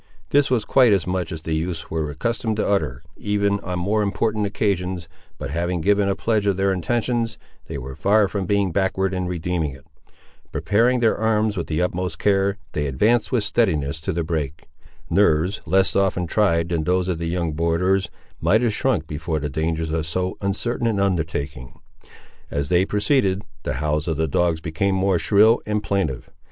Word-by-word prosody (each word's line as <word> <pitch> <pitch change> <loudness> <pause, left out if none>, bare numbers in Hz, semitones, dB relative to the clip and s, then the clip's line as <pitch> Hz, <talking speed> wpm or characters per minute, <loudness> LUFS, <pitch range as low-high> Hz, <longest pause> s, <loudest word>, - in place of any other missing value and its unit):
This 145 0 +4
was 120 -5 +1
quite 125 -2 +5
as 95 - +1
much 90 -2 -2
as 80 -2 -6
the 80 - -2
youths 80 0 -3
were 80 -2 -1
accustomed 110 - -2
to - - 0
utter, 80 -9 0
even 100 -1 0
on 90 -2 -4
more 100 +5 +1
important 105 +1 0
occasions, 95 -4 -1 0.3
but - - -5
having 85 +2 -1
given 100 +3 +2
a 100 - +1
pledge 110 -2 0
of 100 -2 +2
their 95 0 +2
intentions, 115 +5 -1 0.3
they - - -5
were 65 0 -7
far 105 +4 +3
from 95 -2 -3
being 100 -2 +1
backward 95 +1 0
in 90 -1 -2
redeeming 85 -4 -2
it. 65 +2 -15 0.7
Preparing 120 +4 +2
their 115 - +3
arms 110 -1 +1
with 85 - -3
the 80 +2 0
utmost 90 -1 -2
care, 100 0 +2
they 75 -1 -1
advanced 105 - +2
with 120 -4 +2
steadiness 80 -10 0
to 80 - -3
the 85 0 -1
brake. 80 -2 -3 0.4
Nerves 95 0 +2
less 95 +3 +3
often 95 -2 +1
tried 85 -3 +1
than 80 -3 -1
those 90 +1 +1
of 90 -3 -1
the 85 - -2
young 85 -1 -1
borderers 85 +4 +1 0.3
might 110 +3 +3
have 120 -3 +1
shrunk - - +1
before 80 +1 -3
the 75 0 -3
dangers 80 +1 -1
of 80 -1 -1
so 90 +3 -2
uncertain 115 +4 -1
an 110 -3 0
undertaking. 80 -8 -2 0.7
As 70 -1 -2
they 90 +1 +3
proceeded, 105 -2 +1 0.2
the - - -3
howls 75 +3 -1
of 80 -3 -1
the 80 0 +1
dogs 80 +2 +1
became 90 +4 0
more 95 -2 +2
shrill 110 +5 +4
and 105 0 -1
plaintive. 80 -11 -2
95 Hz, 185 wpm, -22 LUFS, 80-105 Hz, 0.7 s, quite